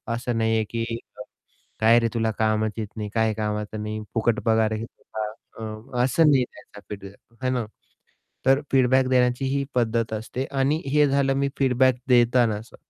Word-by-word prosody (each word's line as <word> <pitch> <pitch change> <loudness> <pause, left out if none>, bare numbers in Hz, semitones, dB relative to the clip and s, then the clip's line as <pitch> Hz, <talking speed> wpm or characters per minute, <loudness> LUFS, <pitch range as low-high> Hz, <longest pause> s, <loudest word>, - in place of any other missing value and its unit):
असं 120 -1 -3
नाही 110 0 +2
आहे, 110 - +2
की 115 0 -2 1.0
"काय 115 +2 +6
रे 115 - +1
तुला 110 -1 0
कामच 110 0 +1
येत 110 -2 -3
नाही, 105 -1 -4
काय 110 -1 +2
कामाचं 105 0 -3
नाही 110 0 -4
फुकट 115 0 +1
पगार 110 -1 +2
का?" - - -4 0.7
आह, 110 +3 -4
असं 135 +6 +3
नाही 130 -2 +4 0.5
फीडबॅक 105 +4 -11
आहे 130 - +1
ना? 125 -3 -1 0.8
तर 135 +1 +5
फीडबॅक 130 0 +4
देण्याची 125 0 +2
ही 140 +1 0
पद्धत 115 -2 0
असते 115 +4 -4
आणि 140 +4 +1
हे 150 -1 +5
झालं 135 0 +2
मी 140 0 +1
फीडबॅक 130 -1 +3
देताना 120 -2 +4
असं. 110 +3 -11
115 Hz, 165 wpm, -24 LUFS, 110-130 Hz, 1.0 s, काय